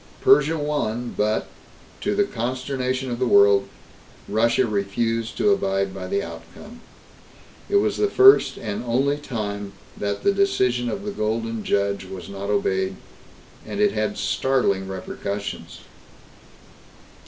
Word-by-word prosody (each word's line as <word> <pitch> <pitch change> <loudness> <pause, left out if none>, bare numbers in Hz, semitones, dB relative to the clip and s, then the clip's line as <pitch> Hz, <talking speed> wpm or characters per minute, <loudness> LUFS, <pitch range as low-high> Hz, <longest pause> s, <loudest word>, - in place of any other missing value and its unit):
Persia 395 - +5
won 125 -6 -2
but, 105 +1 0 0.5
to 205 0 -1
the 205 - +3
consternation 130 - -3
of 120 - -3
the 130 - +1
world, 100 -2 +5 0.6
Russia 115 +4 +2
refused 115 +2 -2
to 210 - +3
abide 95 - 0
by 95 -1 -6
the 100 +2 -1
outcome. 205 - -11 0.9
It - - 0
was 405 - +2
the 415 - +2
first 400 0 +6
and 105 +1 -4
only 135 +4 +1
time 105 -7 -5 0.2
that 100 0 -3
the 200 - +3
decision 125 -12 +1
of 200 - -5
the 205 - -2
Golden 115 - -2
Judge 100 -1 0
was 95 0 -9
not 100 0 -6
obeyed, 95 -2 0 0.7
and - - -6
it 210 -1 +4
had 105 -1 -2
startling 110 -8 0
repercussions. 100 +2 -6
115 Hz, 130 wpm, -23 LUFS, 100-135 Hz, 0.9 s, first